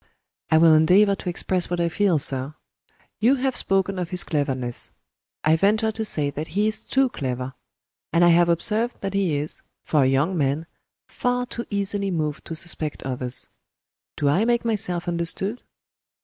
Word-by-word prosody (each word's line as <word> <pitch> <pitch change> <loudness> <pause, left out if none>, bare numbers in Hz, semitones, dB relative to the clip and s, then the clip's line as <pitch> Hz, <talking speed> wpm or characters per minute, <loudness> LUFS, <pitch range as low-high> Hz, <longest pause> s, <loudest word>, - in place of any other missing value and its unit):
"I 160 - +4
will 160 0 +6
endeavor 185 +6 +5
to 185 - -4
express 180 +1 0
what 175 0 -2
I 170 - +2
feel, 180 0 +1
sir. 135 +1 +2 0.6
You 245 +5 +4
have 260 -1 -1
spoken 195 -2 +1
of 175 -2 -3
his 180 0 +2
cleverness. 130 -5 -3 0.5
I 155 +1 +4
venture 215 +5 +2
to 220 +1 -4
say 150 -9 0
that 150 +3 -5
he 200 +6 0
is 215 - -2
too 270 0 +1
clever 130 - -4 0.6
And 170 +1 +4
I - - +6
have 170 0 +4
observed 215 +8 +2
that 195 -1 -3
he 190 -6 +1
is 150 +2 -5 0.2
for 150 - +2
a 130 - +4
young 140 +8 +1
man 145 +1 0 0.4
far 245 0 -1
too 235 -1 -7
easily 200 -1 -2
moved 155 -4 -3
to 165 - -6
suspect 155 -2 -3
others. 125 -1 -2 0.7
Do 145 - 0
I 150 +9 +3
make 235 0 +1
myself 195 -6 -2
understood?" 175 +6 -2
175 Hz, 175 wpm, -23 LUFS, 150-205 Hz, 0.7 s, will